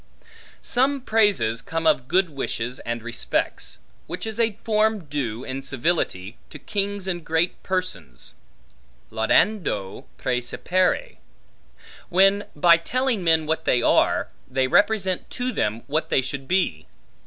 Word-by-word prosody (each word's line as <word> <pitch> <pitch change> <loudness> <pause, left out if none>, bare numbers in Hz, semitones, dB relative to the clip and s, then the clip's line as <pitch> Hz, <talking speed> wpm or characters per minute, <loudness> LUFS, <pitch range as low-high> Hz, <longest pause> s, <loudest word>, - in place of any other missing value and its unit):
Some 270 +2 +1
praises 205 - +2
come 165 0 -4
of 130 -5 +3
good 180 +1 +2
wishes 125 -3 -3
and 120 -1 -4
respects, 120 0 -2 0.3
which 180 +4 -5
is 220 0 -4
a 225 -3 +2
form 215 -3 +1
due, 130 -5 -3
in 135 +1 -5
civility, 130 - -1
to - - -9
kings 200 -1 -3
and 175 -3 -2
great 165 +2 0
persons, 90 - -4 0.8
laudando 110 - +1
praecipere, 180 - -1 0.9
when 195 +3 +4
by 170 +3 +6
telling 245 +4 -1
men 160 -2 +3
what 160 +1 -1
they 120 -1 +3
are, - - +3 0.2
they 130 0 +1
represent 195 +3 +2
to 250 0 -3
them, 110 - -1
what 155 +3 -1
they 130 - +2
should 135 +1 -5
be. 175 - 0
165 Hz, 130 wpm, -23 LUFS, 125-200 Hz, 0.9 s, by